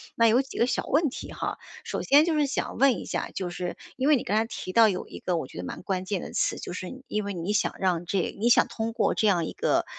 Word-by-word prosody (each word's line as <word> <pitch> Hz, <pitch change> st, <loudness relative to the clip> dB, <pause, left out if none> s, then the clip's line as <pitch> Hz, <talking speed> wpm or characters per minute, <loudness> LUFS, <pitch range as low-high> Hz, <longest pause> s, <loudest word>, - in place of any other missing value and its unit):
那 230 Hz, 0 st, +5 dB
有 235 Hz, +4 st, +5 dB
几 270 Hz, -, -9 dB
个 235 Hz, -, +4 dB
小 -, -, -1 dB
问 300 Hz, +1 st, +2 dB
题 -, -, -8 dB
哈， -, -, -3 dB, 0.3 s
首 -, -, -3 dB
先 290 Hz, +3 st, +6 dB
就 335 Hz, -1 st, +1 dB
是 300 Hz, -1 st, +2 dB
想 275 Hz, -, -3 dB
问 265 Hz, -4 st, +4 dB
一 -, -, -6 dB
下， -, -, -3 dB
就 185 Hz, -2 st, -2 dB
是 175 Hz, 0 st, -4 dB, 0.2 s
因 265 Hz, +2 st, +1 dB
为 300 Hz, -, +6 dB
你 245 Hz, -, -1 dB
刚 210 Hz, -, 0 dB
才 225 Hz, -, +2 dB
提 185 Hz, -5 st, -6 dB
到 225 Hz, +2 st, +6 dB
有 185 Hz, -3 st, -2 dB
一 -, -, -8 dB
个 180 Hz, -, -1 dB
我 160 Hz, -5 st, -2 dB
觉 130 Hz, -, -12 dB
得 90 Hz, -, -4 dB
蛮 -, -, -6 dB
关 185 Hz, -1 st, -2 dB
键 195 Hz, -2 st, -2 dB
的 -, -, -7 dB
词， -, -, 0 dB
就 -, -, -6 dB
是 185 Hz, +9 st, -7 dB
因 210 Hz, -1 st, -2 dB
为 200 Hz, -, -3 dB
你 175 Hz, +3 st, -3 dB
想 210 Hz, -, +1 dB
让 175 Hz, -2 st, 0 dB
这 185 Hz, 0 st, -1 dB
你 230 Hz, -, +2 dB
想 240 Hz, -, +5 dB
通 225 Hz, -1 st, -3 dB
过 230 Hz, -, +2 dB
这 215 Hz, -, +2 dB
样 175 Hz, -4 st, +3 dB
一 -, -, -4 dB
个， -, -, +1 dB
210 Hz, 315 characters per minute, -27 LUFS, 185-255 Hz, 0.3 s, 先